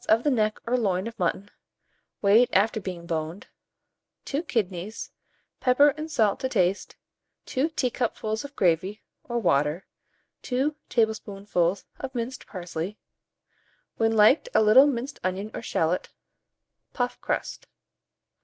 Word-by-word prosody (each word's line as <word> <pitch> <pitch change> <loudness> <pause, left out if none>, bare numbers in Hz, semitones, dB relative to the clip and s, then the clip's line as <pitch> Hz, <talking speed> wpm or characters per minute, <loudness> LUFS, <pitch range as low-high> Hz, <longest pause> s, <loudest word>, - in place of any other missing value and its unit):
of 225 +2 +4
the 295 - +2
neck 215 -4 +1
or 240 +2 +1
loin 195 -6 0
of 230 -1 -7
mutton, 190 +3 -1 0.7
weighed 215 +5 +6
after 215 +3 +3
being 180 -3 -6
boned; 165 +2 -3 0.8
2 285 +2 -1
kidneys, 210 - -3 0.5
pepper 265 +3 +5
and 305 +3 -5
salt 220 -9 +2
to 260 - -2
taste, 190 -5 0 0.5
2 275 +5 0
teacupfuls 240 -6 -2
of 285 0 -10
gravy 185 +4 +1 0.2
or 240 - -3
water, 150 -4 +1 0.6
2 270 +4 -1
tablespoonfuls 200 -5 0
of 265 -1 -6
minced 245 +2 -4
parsley; 180 +1 -5 1.0
when 225 0 +2
liked, 220 - +5
a - - +6
little 245 +7 +7
minced 270 +1 -3
onion 190 +3 -2
or - - -5
shalot; 170 -5 -1 0.8
puff 245 -1 -2
crust. - - -3
215 Hz, 125 wpm, -26 LUFS, 185-250 Hz, 1.0 s, little